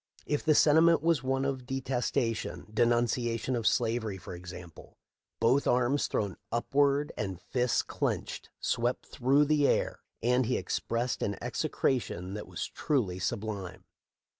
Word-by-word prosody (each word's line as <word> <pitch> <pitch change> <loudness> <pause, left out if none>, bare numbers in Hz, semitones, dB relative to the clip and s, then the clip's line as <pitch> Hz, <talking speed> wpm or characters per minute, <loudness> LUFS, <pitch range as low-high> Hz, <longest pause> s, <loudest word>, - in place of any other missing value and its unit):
If 150 - -1
the 155 -1 +4
sentiment 160 +2 +5
was 165 -5 +3
one 135 +1 0
of 130 -2 -3
detestation 125 -3 -2
— - - -17
■ - - -19
denunciation 120 +1 +1
of 115 -2 0
slavery, 110 -3 +1
for 90 - -9
example 90 -1 -10 0.2
— - - -61
both 125 +5 +3
arms, 125 +3 +2
thrown 100 -3 -2
upward 140 +4 +2
and 95 -4 -4
fists 125 +5 0
clenched, - - -3
swept 120 +1 -1
through 135 +4 +2
the 145 -1 +3
air, - - +1 0.2
and 125 0 +3
he - - +1
expressed 120 +2 -2
an 100 -1 -1
execration 95 -8 -1
that 105 - -6
was - - -4
truly 105 -12 -1
sublime. 100 -2 -4
120 Hz, 145 wpm, -30 LUFS, 110-135 Hz, 0.2 s, sentiment